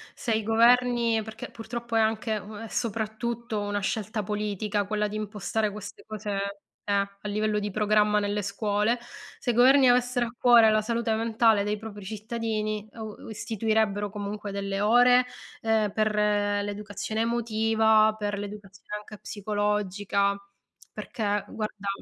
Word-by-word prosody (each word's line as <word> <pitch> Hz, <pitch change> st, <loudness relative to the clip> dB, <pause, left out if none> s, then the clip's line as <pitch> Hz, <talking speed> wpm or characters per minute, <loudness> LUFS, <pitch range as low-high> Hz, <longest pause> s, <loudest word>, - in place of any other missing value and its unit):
se 235 Hz, -, -3 dB
i 220 Hz, -, +1 dB
governi 235 Hz, 0 st, +4 dB
perché, 220 Hz, 0 st, -8 dB
purtroppo, 235 Hz, 0 st, -5 dB
è -, -, +5 dB
anche, 220 Hz, 0 st, +1 dB
ehm, 210 Hz, +1 st, -7 dB
è -, -, -7 dB
soprattutto 230 Hz, 0 st, -2 dB
una 205 Hz, 0 st, -2 dB
scelta 215 Hz, +2 st, -2 dB
politica, 210 Hz, 0 st, -2 dB
quella 210 Hz, 0 st, -1 dB
di 215 Hz, -, -4 dB
impostare 215 Hz, +1 st, -2 dB
queste 210 Hz, +1 st, -9 dB
cose 210 Hz, -2 st, -3 dB, 0.5 s
eh, 205 Hz, -, 0 dB
a 200 Hz, 0 st, -1 dB
livello 210 Hz, 0 st, 0 dB
di 205 Hz, -1 st, -3 dB
programma 210 Hz, 0 st, +3 dB
nelle 205 Hz, 0 st, -1 dB
scuole. 210 Hz, +3 st, 0 dB, 0.4 s
Se -, -, -4 dB
i -, -, -3 dB
governi 260 Hz, +2 st, +6 dB
avessero 245 Hz, 0 st, +2 dB
a 230 Hz, -, -8 dB
cuore 235 Hz, -3 st, +7 dB
la 215 Hz, 0 st, +3 dB
salute 230 Hz, 0 st, -1 dB
mentale 225 Hz, -1 st, +3 dB
dei 210 Hz, +1 st, -1 dB
propri 205 Hz, -2 st, -9 dB
cittadini, 215 Hz, 0 st, -3 dB
o 220 Hz, -2 st, -7 dB
u -, -, -9 dB
istituirebbero, 220 Hz, -2 st, 0 dB
comunque, 205 Hz, 0 st, -5 dB
delle 195 Hz, 0 st, -2 dB
ore, 245 Hz, +4 st, +5 dB, 0.4 s
ehm, 220 Hz, -2 st, +1 dB
per 215 Hz, 0 st, 0 dB
l'educazione 205 Hz, +1 st, -1 dB
emotiva, 220 Hz, -2 st, +3 dB
per 205 Hz, -1 st, -2 dB
l'educazione 205 Hz, 0 st, -8 dB
anche 210 Hz, 0 st, -11 dB
psicologica. 205 Hz, -1 st, -1 dB, 0.6 s
Perché, 205 Hz, -3 st, -2 dB
guarda, 210 Hz, -2 st, -5 dB
215 Hz, 145 wpm, -27 LUFS, 205-225 Hz, 0.6 s, cuore